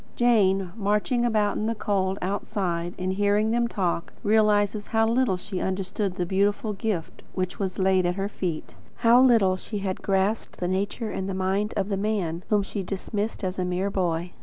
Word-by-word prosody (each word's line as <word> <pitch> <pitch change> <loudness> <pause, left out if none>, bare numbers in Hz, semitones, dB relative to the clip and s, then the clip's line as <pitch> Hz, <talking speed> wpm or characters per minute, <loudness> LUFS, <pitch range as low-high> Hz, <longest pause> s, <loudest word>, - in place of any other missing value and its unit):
Jane, 195 -6 +3
marching 210 +3 +1
about 210 -3 +1
in 215 - -1
the 230 - -1
cold, 195 -2 0
outside, 180 -3 -2
and 185 0 -1
hearing 205 +2 +2
them 235 0 +2
talk, 180 -6 -2
realises 210 -1 +2
how 225 0 +2
little 235 -4 +2
she 190 0 -5
understood 190 0 -2
the 180 - -1
beautiful 205 +3 +1
gift 195 -5 -3
which 185 -1 -2
was 190 -2 -2
laid 190 -1 +3
at 175 - 0
her 195 0 -1
feet; 175 -6 -4 0.3
how 235 +2 +7
little 225 -8 +5
she 210 +3 -6
had 195 -2 -3
grasped 195 +3 0
the 180 - -1
nature 200 +4 -2
and 190 - -3
mind 195 +3 0
of 195 -1 0
the 200 - 0
man 190 -5 -1
whom 210 -2 +3
she 200 +1 -4
dismissed 205 +3 -3
as 185 0 -2
"a - - +1
mere 180 +2 -1
boy." 175 -2 -1
195 Hz, 185 wpm, -26 LUFS, 185-215 Hz, 0.3 s, how